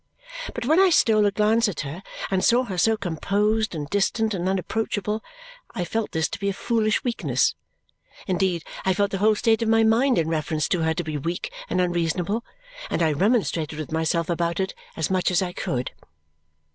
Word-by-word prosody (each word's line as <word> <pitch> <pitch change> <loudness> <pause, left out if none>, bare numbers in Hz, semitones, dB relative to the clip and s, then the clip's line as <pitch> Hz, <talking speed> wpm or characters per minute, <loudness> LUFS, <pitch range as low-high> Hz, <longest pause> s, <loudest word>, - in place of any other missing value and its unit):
But 240 - -3
when 315 +7 +4
I 385 -1 +6
stole 215 -10 +4
a - - +1
glance 220 +3 +3
at 185 - -4
her 150 +5 -6 0.3
and 190 -1 +1
saw 245 +2 +4
her 200 -7 -5
so 220 +4 +3
composed 205 +4 0
and 150 -2 -4
distant 210 +4 +1
and 185 -1 -1
unapproachable, 210 +2 -2 0.5
I 180 - -1
felt 220 +5 -2
this 160 0 0
to - - -6
be 200 0 0
a - - -1
foolish 215 0 0
weakness. 240 -2 +1 0.7
Indeed, 185 -3 0 0.2
I 190 -1 +2
felt 200 0 +1
the 195 - -2
whole 215 +2 +4
state 225 +1 +2
of 225 - +1
my 225 0 +4
mind 240 +4 +3
in 160 - +1
reference 155 -1 -1
to 175 - +1
her 160 0 +1
to 175 - -2
be 155 -2 -3
weak 170 +5 -4 0.2
and - - 0
unreasonable, 175 +4 0 0.5
and - - 0
I 160 - +3
remonstrated 165 - +1
with 155 -1 -6
myself 160 +1 0
about 170 0 -1
it 190 -1 -1 0.2
as 160 +2 -1
much 185 -1 +2
as 180 +1 +2
I 180 -1 -4
could. 125 -6 -3
190 Hz, 195 wpm, -24 LUFS, 170-220 Hz, 0.7 s, I